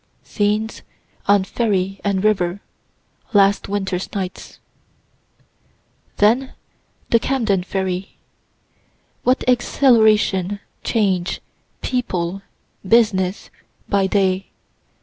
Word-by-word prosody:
SCENES 210 +1 -1 0.5
ON 200 -1 +4
FERRY 195 -2 -1
AND 200 -1 0
RIVER 190 -3 +1 0.7
LAST 200 -1 +3
WINTER'S 190 -2 -2
NIGHTS 185 -2 -5 1.6
Then 240 +6 +3 0.6
the 230 - +5
Camden 225 -8 0
ferry. 190 0 -3 1.0
What 255 +1 +2
exhilaration, 220 -6 +3 0.2
change, 190 -6 0 0.4
people, 195 -7 -2 0.4
business, 195 -3 +2 0.4
by 195 -1 +2
day. 190 -1 +1
200 Hz, 75 wpm, -20 LUFS, 190-220 Hz, 1.6 s, the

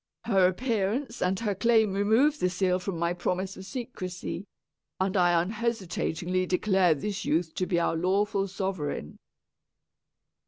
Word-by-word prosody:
Her 195 -5 +4
appearance 230 +4 -1
and 185 +1 +1
her 210 -3 0
claim 220 0 +3
remove 225 +10 +3
the 180 - +2
seal 185 0 +1
from 180 -1 -4
my 170 +1 0
promise 185 +2 -2
of 190 - -10
secresy, 200 -6 -5 0.5
and 190 +1 0
I 175 -2 +4
unhesitatingly 185 -3 -1
declare 185 -2 +3
this 200 +7 -4
youth 160 +1 0
to 185 - -2
be 175 - +1
our 170 - +1
lawful 195 +3 +1
sovereign." 185 - -4
190 Hz, 135 wpm, -28 LUFS, 180-210 Hz, 0.5 s, Her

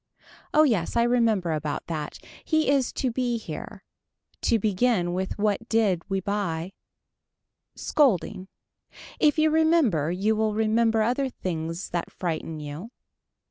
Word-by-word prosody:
Oh 305 - +5
yes 220 - +1
I 235 - +4
remember 230 -7 +2
about 150 -1 -3
that. 155 -3 -5 0.3
He 315 -3 +1
is 270 -3 +2
to 255 - -1
be 245 0 -1
here. 225 - -8 0.6
To 230 - +3
begin 205 -3 +1
with 185 +1 -3
what 210 +2 -1
did 210 -6 +2
we 195 0 0
buy. 190 -3 -2 1.0
Scolding. 205 - +1 0.7
If 300 +1 +4
you 310 0 +3
remember 310 - +3
you 200 +5 +1
will 215 -1 0
remember 220 0 +2
other 255 +4 0
things 165 -5 -4
that 175 -1 -2
frighten 165 -2 -4
you. 150 +8 -7
215 Hz, 135 wpm, -26 LUFS, 175-240 Hz, 1.0 s, Oh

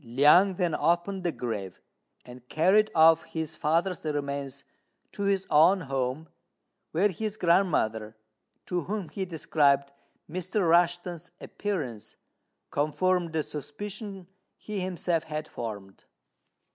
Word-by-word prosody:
Liang 150 +11 +5
then 175 -3 0
opened 175 +6 0
the 175 - 0
grave, 105 - -5 0.5
and 125 0 -13
carried 195 +7 +3
off 165 0 +6
his 160 -2 -5
father's 170 +4 0
remains 140 -3 -3 0.5
to 200 - -4
his 195 -1 +1
own 170 +6 +5
home, 135 +1 -3 0.6
where 190 +6 +2
his 215 +3 -4
grandmother, 115 - +1 0.5
to 180 -1 -1
whom 200 -4 -4
he 195 - -4
described 145 -4 +1 0.4
Mr. 185 +3 -1
Rushten's 175 0 +1
appearance, 145 - -5 0.6
confirmed 165 +4 0
the 160 -1 -1
suspicion 190 - -7 0.3
he 210 -2 -5
himself 175 -3 -1
had 155 0 -5
formed. 100 -7 -8
165 Hz, 115 wpm, -28 LUFS, 140-185 Hz, 0.6 s, off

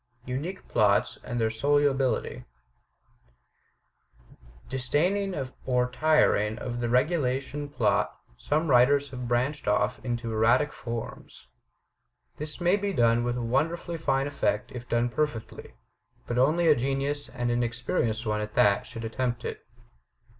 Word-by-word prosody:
Unique 145 +10 -5
Plots 100 -1 +2
and 120 - -3
Their 110 -1 +1
Solubility 135 0 +1 2.2
Disdaining 175 +10 0 0.3
or 125 -1 +1
tiring 125 -7 +3
of 120 0 -4
the 120 -1 -1
regulation 135 +1 0
plot, 130 -7 0 0.2
some 150 - -1
writers 140 +3 +4
have 125 -2 -5
branched 130 +5 -1
off - - +1
into 120 -2 -3
erratic 120 +7 +3
forms. 115 - -7 0.9
This 150 +3 -6
may 175 +3 +3
be 200 -1 -2
done 120 -4 +3
with 120 0 -1
wonderfully 160 +8 -1
fine 135 -3 +1
effect 125 -7 -1
if 125 -1 -8
done 120 +1 +2
perfectly. 120 -4 -4 0.5
But 120 +1 -1
only 160 +6 +3
a 155 - +8
genius, 140 +2 -2
and 120 -1 -2
an 120 0 +1
experienced 120 -1 -1
one 105 -1 0
at 105 0 -6
that, 100 -1 +3
should 115 0 -7
attempt 120 +1 -2
it. - - -5
125 Hz, 130 wpm, -27 LUFS, 120-145 Hz, 2.2 s, a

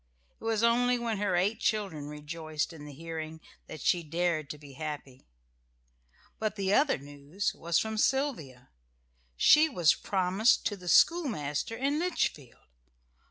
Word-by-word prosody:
It - - -17
was 225 -1 0
only 245 +1 +3
when 230 -3 -2
her 205 -3 0
eight 200 +5 +1
children 195 -10 -1
rejoiced 155 +1 -4
in 150 -2 -10
the 150 - -9
hearing 160 +1 -7 0.3
that 155 - -9
she 175 - +2
dared 165 -2 -1
to 150 - -6
be 145 -2 -13
happy. 140 - -7 1.1
But 215 -1 -2
the 195 -1 0
other 285 +5 +3
news 145 +7 -4
was 170 0 -1
from 220 -1 -1
Sylvia. 200 - -1 0.7
She 310 - +6
was 175 - +4
promised 190 +4 +1
to 205 - 0
the 180 -2 -12
schoolmaster 225 - +2
in 280 +5 0
Litchfield. 240 - -2
180 Hz, 145 wpm, -29 LUFS, 150-225 Hz, 1.1 s, She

